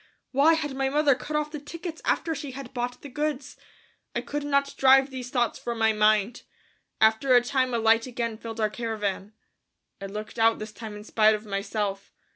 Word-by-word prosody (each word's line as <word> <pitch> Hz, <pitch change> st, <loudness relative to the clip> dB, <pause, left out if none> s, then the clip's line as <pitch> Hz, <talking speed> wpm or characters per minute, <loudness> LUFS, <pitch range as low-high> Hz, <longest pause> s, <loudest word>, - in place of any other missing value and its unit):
Why 290 Hz, +5 st, +5 dB
had 300 Hz, -3 st, -3 dB
my 270 Hz, 0 st, 0 dB
mother 295 Hz, 0 st, +4 dB
cut 290 Hz, +4 st, -5 dB
off 300 Hz, 0 st, -1 dB
the 300 Hz, -, -5 dB
tickets 330 Hz, +3 st, -7 dB
after 325 Hz, -, +1 dB
she 280 Hz, -3 st, -6 dB
had 270 Hz, -1 st, -9 dB
bought 245 Hz, 0 st, -4 dB
the -, -, -7 dB
goods? 295 Hz, 0 st, -3 dB, 0.6 s
I -, -, 0 dB
could 295 Hz, 0 st, -4 dB
not 280 Hz, -1 st, +1 dB
drive 270 Hz, +1 st, +5 dB
these 255 Hz, -1 st, -6 dB
thoughts 240 Hz, -3 st, 0 dB
from 235 Hz, -1 st, -4 dB
my 225 Hz, -1 st, +3 dB
mind. 215 Hz, +2 st, +2 dB, 0.6 s
After 220 Hz, +4 st, +4 dB
a 245 Hz, -, +7 dB
time 255 Hz, 0 st, 0 dB
a -, -, +2 dB
light 225 Hz, +1 st, +3 dB
again 230 Hz, -3 st, -3 dB
filled 230 Hz, -1 st, -7 dB
our 215 Hz, -1 st, +1 dB
caravan. 215 Hz, -3 st, -3 dB, 0.7 s
I 195 Hz, -, -4 dB
looked 210 Hz, +3 st, -7 dB
out 225 Hz, 0 st, +4 dB
this 215 Hz, 0 st, -7 dB
time 215 Hz, 0 st, -8 dB
in 210 Hz, -, -9 dB
spite 215 Hz, 0 st, +3 dB
of 215 Hz, +1 st, -8 dB
myself. 200 Hz, 0 st, -3 dB
240 Hz, 200 wpm, -26 LUFS, 220-275 Hz, 0.7 s, a